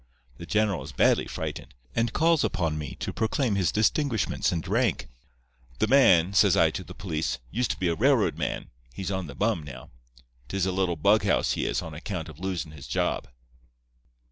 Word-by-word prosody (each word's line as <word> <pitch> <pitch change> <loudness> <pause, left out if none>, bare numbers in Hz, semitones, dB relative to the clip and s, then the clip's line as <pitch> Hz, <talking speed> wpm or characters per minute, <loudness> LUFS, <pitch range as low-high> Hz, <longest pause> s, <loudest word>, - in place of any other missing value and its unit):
The - - -9
general 105 -6 +1
is 70 +3 -8
badly - - +3
frightened, - - -6 0.2
and 115 0 +1
calls 165 -1 +3
upon 85 -3 0
me 75 -3 -5
to - - -3
proclaim 115 +1 0
his 95 -4 +1
distinguishments 110 +2 +1
and 85 -3 -3
rank. - - 0 0.7
"'The - - +2
man,' 100 -8 +5
says 100 -1 +5
I 80 -1 +4
to 95 +3 -5
the 90 - -11
police, 80 -8 -2
'used 120 +3 0
to - - -3
be 95 - 0
a 85 - +2
railroad 80 - +3
man. - - -4 0.2
He's 95 +1 -4
on 95 -3 -3
the 70 - -9
bum 105 -5 0
now. 70 -2 -10 0.6
'Tis 95 +6 -1
a 95 - 0
little 90 -2 0
bughouse 100 +4 +3
he - - -1
is, - - -1
on 80 - -8
account 85 +1 -5
of 80 - -12
losin' 90 -4 -3
his 75 -3 -11
job. - - -1
95 Hz, 190 wpm, -27 LUFS, 80-105 Hz, 0.7 s, man